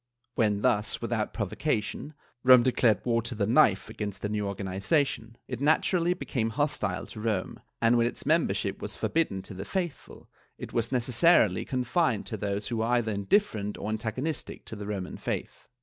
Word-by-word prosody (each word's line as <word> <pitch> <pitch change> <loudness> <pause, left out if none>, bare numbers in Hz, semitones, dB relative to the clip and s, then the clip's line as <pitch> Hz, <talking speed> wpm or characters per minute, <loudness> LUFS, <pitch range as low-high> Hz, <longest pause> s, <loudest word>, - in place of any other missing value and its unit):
^ - - -59 0.3
When 105 -3 +1
thus, 105 +1 +1
without - - -2
provo - - -4
cation, 105 +8 -2 0.3
Rome 130 -1 +8
declared 120 -5 +2
war 115 -1 +2
to 120 +1 -5
the 105 -1 0
knife 110 -4 +4
against 105 -2 -6
the 105 - -1
new 105 -1 -1
organi 100 -1 -4
zation, 115 0 0
it 125 -1 -5
naturally 170 +4 +2
became 120 -10 -2
hostile 110 -7 -1
to - - -10
Rome, 105 -4 -2 0.2
and 115 +1 +4
when 115 - +3
its - - -6
member - - +2
ship - - -3
was - - -4
forbidden 130 -13 -1
to 95 - -9
the 95 +1 -6
faithful, 175 - -5 0.3
it - - -8
was 115 0 0
necessarily 125 - +3
confined 125 - 0
to 110 - -5
those 100 0 -3
who 120 - -2
were 110 - 0
either 120 -3 +1
mdifferent 105 - 0
or 105 - -4
antagonistic 120 +8 -3
to - - -6
the 100 -1 -7
Roman 95 -3 -4
faith. - - -5
115 Hz, 185 wpm, -28 LUFS, 105-130 Hz, 0.3 s, Rome